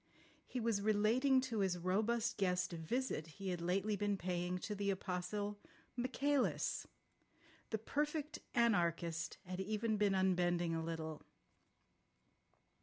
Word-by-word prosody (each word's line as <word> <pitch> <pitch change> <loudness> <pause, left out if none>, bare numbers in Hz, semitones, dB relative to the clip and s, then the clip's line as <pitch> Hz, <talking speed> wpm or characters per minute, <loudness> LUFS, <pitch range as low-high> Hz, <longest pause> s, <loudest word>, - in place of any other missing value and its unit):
He 255 - -3
was 225 -3 +1
relating 225 +6 +4
to 245 -4 -2
his 190 -2 +2
robust 220 +6 +1
guest 180 -2 +1
a - - -3
visit 165 -1 -1
he 195 -1 -3
had 175 -2 -2
lately 195 +4 +1
been 205 0 0
paying 180 0 -1
to 210 +3 -4
the 200 0 -1
Apostle 195 +2 -2 0.4
Michaelis. 260 +2 +1 0.8
The 220 - 0
Perfect 300 +6 -2 0.2
Anarchist 170 -8 +2
had 185 +1 -5
even 215 +2 0
been 205 -2 +3
unbending 175 -2 +2
a 165 - 0
little. 160 -1 -4
200 Hz, 125 wpm, -38 LUFS, 180-230 Hz, 0.8 s, relating